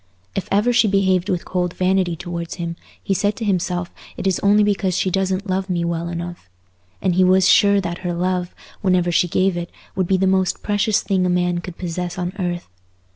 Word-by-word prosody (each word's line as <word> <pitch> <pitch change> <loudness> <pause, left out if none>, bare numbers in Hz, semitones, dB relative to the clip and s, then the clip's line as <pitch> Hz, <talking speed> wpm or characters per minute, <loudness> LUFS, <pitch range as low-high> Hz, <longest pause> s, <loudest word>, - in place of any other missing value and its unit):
If 195 - -3
ever 210 +5 +3
she 230 - +4
behaved 190 -1 +2
with 180 -3 -1
cold 180 -1 -2
vanity 185 -2 +1
towards 170 -1 -5
him, 170 -1 -4 0.3
he 195 - 0
said 205 +2 +1
to 225 - -4
himself 180 -2 -1 0.2
it - - -5
is 190 -2 +1
only 205 +1 +4
because 195 -3 +1
she 185 - 0
doesn't 190 +1 -1
love 190 +1 -1
me 170 -2 0
well 170 0 -2
enough; 175 - -6 0.5
and 185 - +2
he 185 +2 +4
was 185 0 +5
sure 200 0 +5
that 175 -2 -4
her 175 -2 -3
love, 180 0 -1 0.3
whenever 180 -3 +2
she 175 +1 +3
gave 185 +2 +1
it, 175 0 -4 0.3
would 185 -2 0
be 190 - +3
the 190 - +1
most 190 -1 +1
precious 205 0 +1
thing 190 -2 +1
a 180 - +1
man 180 0 +1
could 175 0 -8
possess 175 0 -4
on 180 0 -3
earth. 175 -1 -2
185 Hz, 210 wpm, -21 LUFS, 175-195 Hz, 0.5 s, was